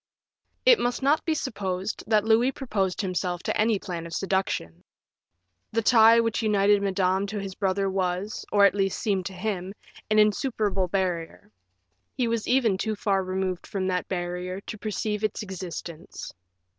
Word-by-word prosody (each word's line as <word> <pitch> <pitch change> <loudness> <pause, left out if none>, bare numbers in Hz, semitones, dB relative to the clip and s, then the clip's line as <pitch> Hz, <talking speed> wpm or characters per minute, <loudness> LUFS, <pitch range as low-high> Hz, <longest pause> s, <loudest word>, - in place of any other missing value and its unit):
It - - +7
must 245 +2 -1
not 290 +3 +3
be 320 - +1
supposed 200 -7 -3
that 215 -2 +3
Louis 225 +4 +3
proposed 200 -10 -2
to 205 - -2
himself 180 -1 -2
any 215 0 +2
plan 175 -4 -6
of 165 - -6
seduction; 190 - -2 0.9
the 230 0 +1
tie 230 0 +7
which 230 -1 0
united 205 -2 +3
Madame 190 0 +1
to 210 +1 -5
his 195 -1 -5
brother 195 0 0
was, 190 +1 -2
or 200 -1 +6
at - - +5
least, 195 -1 0
seemed 195 -5 -1
to 195 - -8
him, 190 0 -4 0.3
an 215 - +2
insuperable 210 -3 +2
barrier; 175 - -3 0.7
he 250 -3 +1
was 230 -1 -1
even 235 -7 +2
too 220 +1 -1
far 195 -2 0
removed 185 -1 -3
from 195 -3 -2
that 180 -1 -1
barrier 180 0 -3
to 215 - -7
perceive 210 0 -2
its 215 0 -1
existence. 175 -4 -7
195 Hz, 160 wpm, -26 LUFS, 185-220 Hz, 0.9 s, It